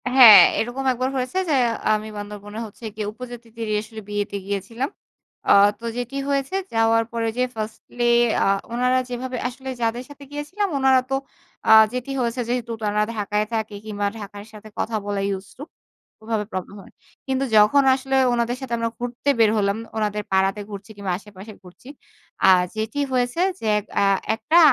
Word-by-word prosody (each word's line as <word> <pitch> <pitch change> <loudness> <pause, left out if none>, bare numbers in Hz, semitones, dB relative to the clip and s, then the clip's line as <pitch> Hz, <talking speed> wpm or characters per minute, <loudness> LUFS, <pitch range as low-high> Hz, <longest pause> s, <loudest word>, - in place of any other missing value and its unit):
হ্যাঁ, 245 -5 +10 0.2
এরকম 245 +4 -2
একবার 255 +1 -1
হয়েছে 255 +7 -2
যে, - - +2 0.4
আমি 215 0 -2
বান্দরবনে 205 +1 -7
হচ্ছে 215 +2 -14
গিয়ে 210 -1 -3
উপজাতিদেরই 230 -2 -6
আসলে 220 0 -10
বিয়েতে 205 -1 -2
গিয়েছিলাম। 205 +7 -3 0.6
আ - - +7 0.3
তো 235 - -9
যেটি 245 +3 -4
হয়েছে 275 +5 -1 0.2
যাওয়ার 225 0 +3
পরে 230 -1 -1
যে 250 - +2
ফার্স্টলি 220 +2 -5 0.4
আ - - +2 0.3
উনারা 250 +1 +2
যেভাবে 250 +1 -4
আসলে 265 +1 -8
যাদের 230 +2 -1
সাথে 285 0 -12
গিয়েছিলাম 300 +8 -2
ওনারা 265 -1 +4
তো - - +2 0.5
আ - - +7 0.2
যেটি 250 +2 -4
হয়েছে 240 +1 -1
যেহেতু 240 -1 -2
তারা 210 0 +1
ঢাকায় 210 0 -1
থাকে 220 -2 -2
কিংবা 205 -1 -2
ঢাকার 205 0 -9
সাথে 215 0 -12
কথা 225 - -1
বলা 205 -1 -2
ইউসটু 200 +7 -6 0.5
তো - - -54
ওভাবে 220 -2 -1
প্রবলেম 185 +2 -5
হয়। - - -18 0.3
কিন্তু 265 0 0
যখন 215 +7 +6
আসলে 270 0 -2 0.2
ওনাদের 240 +1 0
সাথে 260 -3 -5
আমরা 230 0 -1
ঘুরতে 245 +3 -3
বের 220 -2 +5
হলাম, 200 0 +1 0.2
ওনাদের 210 -1 -1
পাড়াতে 195 +2 +2
ঘুরছি 200 -1 -9
কিংবা 200 -2 -3
আশেপাশে 205 +1 -12
ঘুরছি। 185 +8 -15 0.6
আর 180 -1 +6
যেটি 220 +5 -3
হয়েছে 250 +5 0 0.2
যে - - -7
এক 210 - -12 0.2
আ - - +4 0.3
একটা 310 +8 +3
225 Hz, 165 wpm, -22 LUFS, 210-250 Hz, 0.6 s, হ্যাঁ